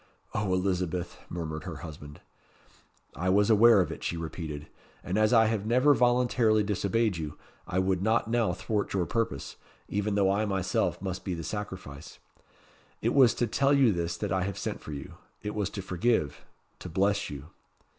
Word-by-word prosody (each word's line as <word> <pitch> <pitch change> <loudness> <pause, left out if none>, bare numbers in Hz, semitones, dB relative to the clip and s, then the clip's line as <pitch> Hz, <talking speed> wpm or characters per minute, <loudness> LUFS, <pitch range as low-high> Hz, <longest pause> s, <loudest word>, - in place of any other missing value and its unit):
"O, 105 -3 -1
Elizabeth!" 90 -2 -2
murmured 80 -2 -5
her - - -5
husband. 75 -2 -10 0.9
"I 90 +3 -1
was 100 +3 +4
aware 110 -1 +7
of 90 - -2
it," - - -8
she 85 - -2
repeated; 80 -2 -5 0.4
"and 90 - -3
as 110 +1 +3
I 115 -2 +6
have 110 -1 -1
never 130 +5 +5
voluntarily 120 -4 +3
disobeyed 105 0 0
you, 75 -2 -5 0.3
I 95 - -2
would 95 -1 +1
not 110 +3 +2
now 115 -4 +1
thwart 105 +3 -2
your 90 -2 +1
purpose, 105 - -2 0.3
even 105 0 -1
though 95 -2 +3
I 105 +2 +1
myself 95 -3 0
must 95 -1 -4
be 95 -3 -2
the 85 - -6
sacrifice. 90 -6 -7 0.9
It 115 - +2
was 130 -5 +6
to 120 - +1
tell 135 +5 +2
you 135 -5 +5
this 85 -2 -2
that 100 +1 -3
I 95 +1 +1
have 95 +1 -3
sent - - -4
for - - -8
you. 70 -1 -8 0.3
It 105 - -3
was 105 -2 -1
to 100 - -6
forgive 90 - 0 0.3
to 90 - -7
bless 100 +4 +1
you." 75 +2 -8
100 Hz, 180 wpm, -28 LUFS, 85-110 Hz, 0.9 s, aware